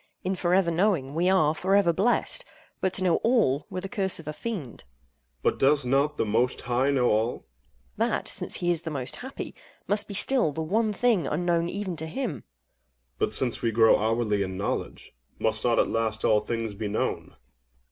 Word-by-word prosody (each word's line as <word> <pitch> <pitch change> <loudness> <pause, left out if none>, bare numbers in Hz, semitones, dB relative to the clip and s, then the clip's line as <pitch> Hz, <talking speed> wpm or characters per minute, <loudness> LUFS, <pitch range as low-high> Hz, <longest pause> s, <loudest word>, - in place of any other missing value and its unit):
In 185 - -1
for 180 -1 +1
ever 185 -3 +3
knowing, 165 -6 +1
we 175 +4 +2
are 155 -6 +3
for 190 +4 +1
ever 190 -4 +4
blessed; 235 - +2 0.4
but 190 - 0
to 190 - 0
know 180 -3 +3
all 185 - +2
were 185 - -4
the 195 - -5
curse 195 -4 -1
of 160 - -12
a 150 - -3
fiend. 175 - -6
OINOS. 65 0 -40
But - - +1
does 140 0 +3
not 140 +4 +1
The - - +1
Most 115 +4 0
High 125 +3 +1
know 135 -3 +2
all? 110 +3 +1
AGATHOS. - - -16 0.5
That - - 0
(since - - -3
he 175 0 0
is 170 -2 0
The 165 - -5
Most 135 -4 -4
Happy) 265 +2 -7 0.3
must 205 +1 +2
be 200 - -6
still 230 - +3
the 160 - -3
one 215 +7 +1
thing 210 - +1
unknown 170 +1 0
even 195 -2 -4
to 160 +1 -5
Him. 250 +6 -3
OINOS. 130 -8 -9 0.8
But, - - +1
since 125 -3 -3
we 115 - +1
grow 110 0 +5
hourly 110 -1 0
in 95 -1 -3
knowledge, 100 - -4 0.2
must 110 0 -1
not 120 -1 +2
at - - +3
last 110 -1 -1
all 105 - +4
things 115 0 -3
be 105 +1 -4
known? 105 - -3
150 Hz, 210 wpm, -26 LUFS, 115-190 Hz, 0.8 s, grow